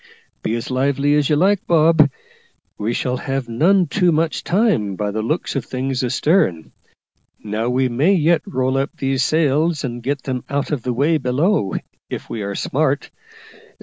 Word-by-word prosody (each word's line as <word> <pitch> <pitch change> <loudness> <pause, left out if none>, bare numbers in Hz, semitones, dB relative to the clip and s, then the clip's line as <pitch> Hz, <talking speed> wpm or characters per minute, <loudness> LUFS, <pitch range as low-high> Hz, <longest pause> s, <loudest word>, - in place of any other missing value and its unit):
Be 110 - -1
as 120 +2 -5
lively 140 +2 +1
as 150 -2 +2
you 150 - +3
like, 190 +5 +2
Bob; 160 -2 +5 0.7
we 105 +3 -2
shall 125 +1 -1
have 135 0 -3
none 175 +11 +3
too 180 +3 +2
much 160 +1 0
time, 175 - +1
by 105 +1 -2
the 110 +2 -2
look 155 +10 -2
of 135 - -1
things 130 0 -3
astern. 125 - +1 0.7
Now 110 +3 -2
we 130 +1 +1
may 135 +11 +2
yet 170 0 +3
roll 130 -6 0
up 135 - -1
these 135 0 0
sails 155 +1 +1
and 120 -2 -4
get 135 +3 -2
them 130 -2 -3
out 140 +1 -2
of 145 -5 -1
the 125 - -2
way 145 +6 +1
below, 130 - 0 0.3
if - - -6
we 110 - -4
are 100 0 -4
smart. - - -1
135 Hz, 175 wpm, -20 LUFS, 125-160 Hz, 0.7 s, Bob